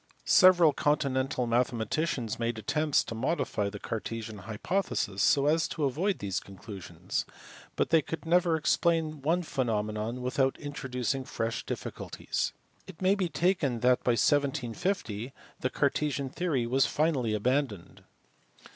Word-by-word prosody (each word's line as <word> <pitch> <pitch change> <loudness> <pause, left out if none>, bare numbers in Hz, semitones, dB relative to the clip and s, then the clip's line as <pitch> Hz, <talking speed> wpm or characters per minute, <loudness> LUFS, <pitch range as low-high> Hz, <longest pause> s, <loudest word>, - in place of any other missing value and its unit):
Several 175 -5 +6
continental 135 -3 0
mathematicians 120 +1 0
made 115 -1 -1
attempts 150 +7 +1
to - - -6
modify 110 -4 -1
the 105 - -7
Cartesian 110 0 -5
hypothesis 105 - -2
so 140 +6 +4
as 160 +2 +3
to 155 - -4
avoid 175 +9 0
these 95 -3 -2
conclusions, 100 -1 -6 0.5
but - - 0
they 165 -1 +6
could 160 +3 -6
never 170 0 +3
explain 160 -1 +1
one 170 +5 +1
phenomenon 110 -3 -2
without 130 +1 +1
introducing 135 -2 -3
fresh 115 -2 -3
difficulties. - - -3 0.4
It - - -11
may 185 +1 +3
be 190 -3 -1
taken 165 -10 +1
that 125 0 +3
by 120 - +3
1750 135 - 0 0.3
the 130 - 0
Cartesian 140 -1 0
theory 150 -9 0
was 130 +1 +3
finally 135 -8 +1
abandoned. 110 -5 -1
130 Hz, 130 wpm, -29 LUFS, 115-155 Hz, 0.5 s, Several